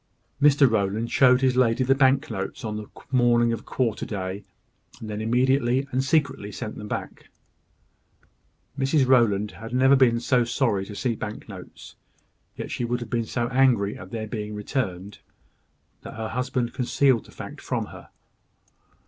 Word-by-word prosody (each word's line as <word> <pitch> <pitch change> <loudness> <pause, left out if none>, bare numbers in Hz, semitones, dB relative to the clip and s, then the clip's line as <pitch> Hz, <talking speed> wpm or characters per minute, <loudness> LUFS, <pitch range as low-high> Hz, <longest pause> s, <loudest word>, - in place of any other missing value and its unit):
Mr 145 -1 +6
Rowland 110 +1 -1
showed 125 -1 +5
his 130 -1 +2
lady 125 0 +3
the 130 +1 +4
bank 135 +2 +2
notes 95 +3 -5
on 105 -1 -3
the 105 -1 -6 0.2
morning 120 -2 +3
of 115 - -6
quarter 120 -5 -1
day, 95 -1 -4 0.6
and 110 - -8
then 105 +1 -4
immediately 130 +3 +2
and 130 +1 0
secretly 135 -7 0
sent 105 +2 -6
them 105 - -8
back. - - -6 1.5
Mrs 135 +1 +2
Rowland 105 -5 +3
had 115 +2 -7
never 135 +2 +5
been 120 -3 +4
so 120 +1 +2
sorry 115 -5 0
to 105 - -9
see 120 +2 -1
bank 105 0 -7
notes; 95 -4 -11 0.6
yet - - -6
she - - -3
would 120 +1 -1
have 120 - -8
been 115 -2 -1
so 120 0 -1
angry 125 -6 +2
at - - -10
their 110 -2 -4
being 105 -1 -5
returned, 105 -4 -4 0.8
that - - -10
her 110 0 -4
husband 125 0 -2
concealed 130 -1 +2
the - - -16
fact - - -9
from - - -2
her. - - -12
120 Hz, 165 wpm, -25 LUFS, 105-130 Hz, 1.5 s, Mr